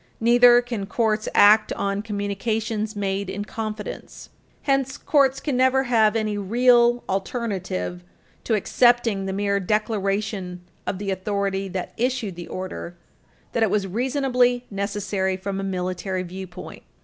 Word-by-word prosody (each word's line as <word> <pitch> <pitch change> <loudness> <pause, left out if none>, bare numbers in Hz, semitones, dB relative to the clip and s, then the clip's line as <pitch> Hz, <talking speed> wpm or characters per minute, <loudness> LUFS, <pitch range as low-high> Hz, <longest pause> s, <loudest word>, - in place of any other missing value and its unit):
Neither 240 +1 +6
can 230 -5 -4
courts 215 -1 0
act 215 +1 +6
on 200 0 -2
communications 215 +1 -2
made 195 -1 -2
in 205 +1 -4
confidence. 215 -1 -6 0.3
Hence, 270 -1 0
courts 275 -3 +2
can 290 -4 -2
never 260 +1 +3
have 225 -4 +3
any 215 -2 -1
real 240 +3 +4
alternative 190 - -3 0.4
to 225 - +2
accepting 230 -2 +2
the - - -2
mere 200 +1 0
declaration 200 -2 -1 0.3
of 190 - -1
the 200 0 -3
authority 195 0 -2
that 185 -1 -5
issued 240 -5 -1
the 175 0 -8
order 185 -2 -6 0.5
that 230 - -1
it 220 - +4
was 200 0 +1
reasonably 250 +3 +1
necessary 200 -1 -2
from 195 +1 -4
a - - -3
military 185 0 -2
viewpoint. 185 0 -9
205 Hz, 135 wpm, -23 LUFS, 195-235 Hz, 0.5 s, Neither